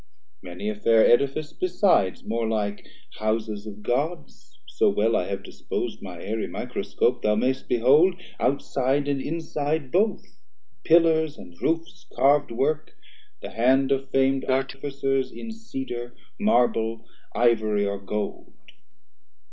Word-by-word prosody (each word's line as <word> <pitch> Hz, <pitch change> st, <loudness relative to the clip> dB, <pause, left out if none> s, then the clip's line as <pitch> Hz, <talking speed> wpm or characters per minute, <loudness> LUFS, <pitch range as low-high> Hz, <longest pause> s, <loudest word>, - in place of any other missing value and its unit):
Many 90 Hz, +3 st, -7 dB
a 105 Hz, -, 0 dB
fair 110 Hz, +2 st, +4 dB
Edifice 140 Hz, +5 st, +2 dB
besides, 180 Hz, -, +1 dB
more 115 Hz, 0 st, -1 dB
like 105 Hz, -2 st, -2 dB, 0.3 s
Houses 110 Hz, -1 st, -2 dB
of 105 Hz, 0 st, -9 dB
Gods 150 Hz, +10 st, -3 dB
(so -, -, +2 dB
well 105 Hz, +3 st, +2 dB
I 90 Hz, -, 0 dB
have 100 Hz, 0 st, -4 dB
dispos'd -, -, -5 dB
My 90 Hz, -3 st, -8 dB
Aerie 110 Hz, +4 st, -3 dB
Microscope) -, -, -1 dB
thou 105 Hz, 0 st, +2 dB
may'st 130 Hz, +4 st, -1 dB
behold 140 Hz, +10 st, +5 dB, 0.2 s
Outside 140 Hz, +1 st, 0 dB
and 140 Hz, -1 st, 0 dB
inside 155 Hz, -2 st, -2 dB
both, 205 Hz, +4 st, 0 dB, 0.4 s
pillars 160 Hz, -2 st, +4 dB
and 85 Hz, -, -12 dB
roofs 165 Hz, +1 st, -2 dB
Carv'd 140 Hz, +3 st, +4 dB
work, 140 Hz, +6 st, -1 dB, 0.5 s
the -, -, -6 dB
hand 130 Hz, +4 st, +3 dB
of 135 Hz, 0 st, 0 dB
fam'd 135 Hz, 0 st, +2 dB
Artificers 135 Hz, 0 st, -1 dB
In 230 Hz, -, -8 dB
Cedar, 130 Hz, -, -6 dB, 0.2 s
Marble, 115 Hz, -, +1 dB, 0.3 s
Ivory 110 Hz, -3 st, +2 dB
or 100 Hz, 0 st, -2 dB
Gold. 105 Hz, +2 st, -5 dB
130 Hz, 125 wpm, -25 LUFS, 110-145 Hz, 0.5 s, behold